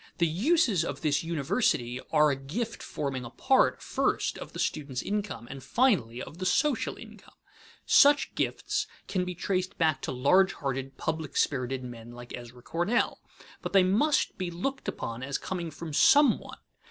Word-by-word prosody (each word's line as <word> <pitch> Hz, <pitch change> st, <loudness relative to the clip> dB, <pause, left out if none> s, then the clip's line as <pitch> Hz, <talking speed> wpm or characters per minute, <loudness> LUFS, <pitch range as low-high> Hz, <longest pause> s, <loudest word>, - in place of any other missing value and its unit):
The 170 Hz, -, +3 dB
uses 205 Hz, -, +2 dB
of -, -, -5 dB
this 145 Hz, -1 st, +1 dB
university 155 Hz, -, 0 dB
are 150 Hz, -1 st, +5 dB
a -, -, 0 dB
gift 180 Hz, -, -4 dB
forming 135 Hz, -3 st, -4 dB
a 120 Hz, -, -7 dB
part, -, -, +2 dB
first, -, -, 0 dB
of -, -, -8 dB
the -, -, -9 dB
student's 140 Hz, -4 st, -2 dB
income, 200 Hz, -, -3 dB
and, 135 Hz, +1 st, -8 dB
finally, 130 Hz, -, +1 dB
of 165 Hz, -, -11 dB
the 185 Hz, -, -3 dB
social 270 Hz, +8 st, +1 dB
income. -, -, -14 dB, 0.5 s
Such 290 Hz, +1 st, +5 dB
gifts -, -, -1 dB, 0.2 s
can 185 Hz, -2 st, -1 dB
be 180 Hz, 0 st, -5 dB
traced 185 Hz, +1 st, -2 dB
back 155 Hz, -5 st, +2 dB
to -, -, -3 dB
large 160 Hz, +10 st, +4 dB
hearted, 135 Hz, -1 st, -4 dB
public 160 Hz, -2 st, -3 dB
spirited 130 Hz, -1 st, 0 dB
men 120 Hz, -1 st, -9 dB
like 120 Hz, 0 st, -8 dB
Ezra 120 Hz, 0 st, -11 dB
Cornell, 175 Hz, -, 0 dB, 0.4 s
but -, -, -5 dB
they 195 Hz, -2 st, +6 dB
must 225 Hz, +12 st, +2 dB
be 185 Hz, -2 st, -2 dB
looked 265 Hz, +11 st, -4 dB
upon 115 Hz, +1 st, -4 dB
as 140 Hz, +1 st, -2 dB
coming 175 Hz, -3 st, -4 dB
from 160 Hz, +1 st, -8 dB
some 285 Hz, -, +6 dB
one. -, -, -11 dB
160 Hz, 170 wpm, -28 LUFS, 130-195 Hz, 0.5 s, they